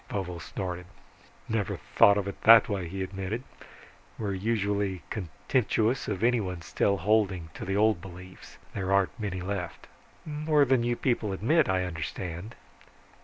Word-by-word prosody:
Vovo 90 Hz, -4 st, -4 dB
snorted. 90 Hz, +1 st, -5 dB, 0.6 s
"Never 110 Hz, -4 st, -1 dB, 0.2 s
thought 100 Hz, 0 st, +7 dB
of 100 Hz, -1 st, -1 dB
it 100 Hz, -, -7 dB
that 115 Hz, -1 st, +8 dB
way," 95 Hz, -4 st, -2 dB
he 95 Hz, +1 st, -3 dB
admitted. 95 Hz, +5 st, -4 dB, 0.7 s
"We're 105 Hz, -3 st, -2 dB
usually 100 Hz, -3 st, -1 dB
contemptuous 110 Hz, -, 0 dB
of 95 Hz, -, -2 dB
anyone 100 Hz, -8 st, +1 dB
still 100 Hz, +4 st, +1 dB
holding 95 Hz, -4 st, +1 dB
to -, -, -7 dB
the 95 Hz, +1 st, -1 dB
old 105 Hz, -4 st, +3 dB
beliefs. 90 Hz, 0 st, -12 dB, 0.2 s
There 95 Hz, -1 st, -2 dB
aren't 100 Hz, +1 st, +2 dB
many 95 Hz, -4 st, -3 dB
left." 90 Hz, -2 st, -4 dB, 0.4 s
"More 150 Hz, -1 st, +2 dB
than 130 Hz, -2 st, +3 dB
you 120 Hz, 0 st, +1 dB
people 115 Hz, -5 st, 0 dB
admit, 140 Hz, -, +2 dB
I 95 Hz, -1 st, +1 dB
understand." 85 Hz, -, -5 dB
100 Hz, 145 wpm, -28 LUFS, 90-110 Hz, 0.7 s, that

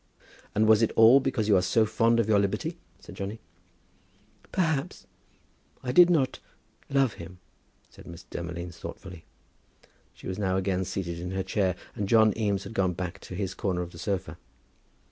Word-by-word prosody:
"And 110 Hz, -, +3 dB
was 110 Hz, 0 st, +6 dB
it 115 Hz, -, +2 dB
all 115 Hz, +4 st, +8 dB
because 130 Hz, -5 st, -1 dB
you 105 Hz, -, +5 dB
are 90 Hz, -, +4 dB
so 110 Hz, +4 st, +2 dB
fond 115 Hz, +2 st, +2 dB
of 115 Hz, -, +1 dB
your 105 Hz, -2 st, +4 dB
liberty?" 100 Hz, 0 st, -2 dB, 0.2 s
said -, -, -12 dB
Johnny. 100 Hz, +3 st, -5 dB, 1.1 s
"Perhaps, 160 Hz, -7 st, -1 dB, 0.8 s
I 125 Hz, -, -2 dB
did 175 Hz, +6 st, +7 dB
not 145 Hz, -7 st, +1 dB, 0.5 s
love 135 Hz, -4 st, +2 dB
him," 85 Hz, +2 st, -10 dB, 0.5 s
said -, -, -15 dB
Miss 85 Hz, +1 st, -10 dB
Demolines, 85 Hz, 0 st, -7 dB
thoughtfully. 90 Hz, -4 st, -9 dB, 0.9 s
She -, -, -15 dB
was 95 Hz, +1 st, -4 dB
now 95 Hz, -2 st, 0 dB
again 95 Hz, -1 st, -1 dB
seated 90 Hz, -3 st, -4 dB
in 90 Hz, +1 st, -5 dB
her 95 Hz, 0 st, -1 dB
chair, 95 Hz, -1 st, 0 dB, 0.2 s
and 100 Hz, -2 st, -4 dB
John 110 Hz, -2 st, +5 dB
Eames 100 Hz, -3 st, -1 dB
had 100 Hz, -, -9 dB
gone 95 Hz, -4 st, +1 dB
back 90 Hz, +2 st, -5 dB
to 90 Hz, -, -9 dB
his 95 Hz, 0 st, -3 dB
corner 90 Hz, -3 st, -2 dB
of 85 Hz, -, -9 dB
the 85 Hz, -, -12 dB
sofa. 90 Hz, -2 st, -3 dB
100 Hz, 175 wpm, -27 LUFS, 90-110 Hz, 1.1 s, all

